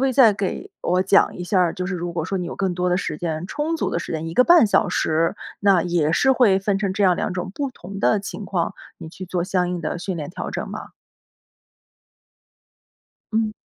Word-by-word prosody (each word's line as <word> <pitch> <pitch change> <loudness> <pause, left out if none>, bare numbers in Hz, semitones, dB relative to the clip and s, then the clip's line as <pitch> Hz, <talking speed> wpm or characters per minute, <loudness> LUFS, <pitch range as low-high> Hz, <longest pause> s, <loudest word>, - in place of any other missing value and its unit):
可 270 - +3
以 260 - 0
再 240 -4 +6
给 200 - -4
我 180 +1 +1
讲 195 +1 +3
一 180 - -5
下 185 +1 +2
儿， 175 -2 +2
就 180 -2 -3
是 195 - -3
如 175 -1 -4
果 160 -2 -2
说 195 +2 -2
你 180 - -3
有 - - -6
更 190 -3 -1
多 180 0 0
的 180 - +2
时 155 -5 -3
间、 165 0 -3
充 300 - -2
足 - - -1
的 - - -1
时 - - -7
间， 160 0 -3
1 165 - -6
个 250 - +6
半 345 -2 +6
小 205 0 +2
时， 165 +1 0 0.2
那 195 -4 +4
也 170 -3 +1
是 265 +10 +3
会 225 -7 +4
分 195 0 0
成 195 -2 -1
这 200 +1 +1
样 185 -2 +5
2 - - -2
种 180 +1 -4
不 280 -2 -2
同 195 -3 -9
的 210 - +3
情 200 +1 -6
况， 175 -4 -2 0.2
你 160 - -8
去 185 +3 -9
做 175 -1 -2
相 180 -1 0
应 180 -1 -3
的 155 - -3
训 185 +1 -4
练 150 -3 -5
调 - - -5
整 - - -4
吗？ - - -7 2.4
嗯。 220 -1 +1
185 Hz, 245 characters per minute, -22 LUFS, 175-205 Hz, 2.4 s, 再